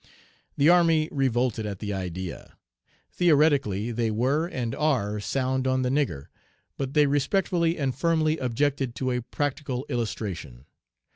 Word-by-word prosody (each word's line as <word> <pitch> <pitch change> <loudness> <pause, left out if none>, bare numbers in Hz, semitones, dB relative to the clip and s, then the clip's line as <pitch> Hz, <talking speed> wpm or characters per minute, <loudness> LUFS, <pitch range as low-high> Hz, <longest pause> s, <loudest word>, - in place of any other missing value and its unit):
The 140 - +4
army 165 -2 +4
revolted 125 -5 0
at 100 -2 -5
the 105 +1 -4
idea. 90 -2 -6 0.5
Theoretically 140 - +2
they 115 -1 0
were 130 +9 +1
and 125 -9 -3
are 120 -9 0
sound 130 +4 -1
on 130 0 +1
the 125 - 0
nigger, 135 - -1 0.5
but 135 +1 -4
they 150 -1 +6
respectfully 165 +4 +1
and 135 -3 -1
firmly 160 +2 +1
objected 130 0 -1
to 130 -1 -1
a 125 0 -1
practical 135 0 -3
illustration. 95 - -4
130 Hz, 135 wpm, -26 LUFS, 115-150 Hz, 0.5 s, they